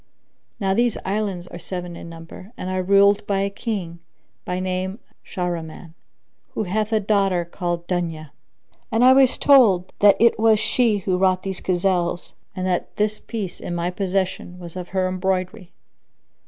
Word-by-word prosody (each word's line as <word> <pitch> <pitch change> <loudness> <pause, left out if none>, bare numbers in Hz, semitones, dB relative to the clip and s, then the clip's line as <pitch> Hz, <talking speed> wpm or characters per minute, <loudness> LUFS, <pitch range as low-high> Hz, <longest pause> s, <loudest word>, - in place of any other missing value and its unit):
Now 195 -2 +1
these 235 +2 +1
islands 195 -3 -2
are 175 - -10
seven 180 0 -6
in 170 - -9
number 165 +5 -11
and 185 - -4
are 185 0 0
ruled 200 +2 +4
by 195 -1 +1
a 200 0 -1
King, 195 -6 -4 0.5
by 180 0 -2
name 185 +1 -2 0.3
Shahriman,[FN#7] 170 -3 -5 0.6
who - - 0
hath 215 +3 -1
a 220 - +3
daughter 195 -4 +1
called 175 -1 -4
Dunyá;[FN#8] 165 -4 -3 0.6
and 225 +2 +3
I 260 - +8
was 265 -1 +4
told 215 -11 +5
that 205 -1 +7
it 230 -2 +4
was 220 -1 +4
she 230 -2 +2
who 185 -2 +1
wrought 185 -1 +2
these 190 -2 -4
gazelles 175 -1 0 0.2
and 185 - -3
that 180 -1 -2
this 210 0 0
piece 210 -6 -5
in 175 - -5
my 175 +1 -1
possession 185 -1 -2
was 175 -1 -10
of 180 -1 -6
her 185 0 0
embroidery. 185 +1 -2
185 Hz, 165 wpm, -22 LUFS, 175-205 Hz, 0.6 s, I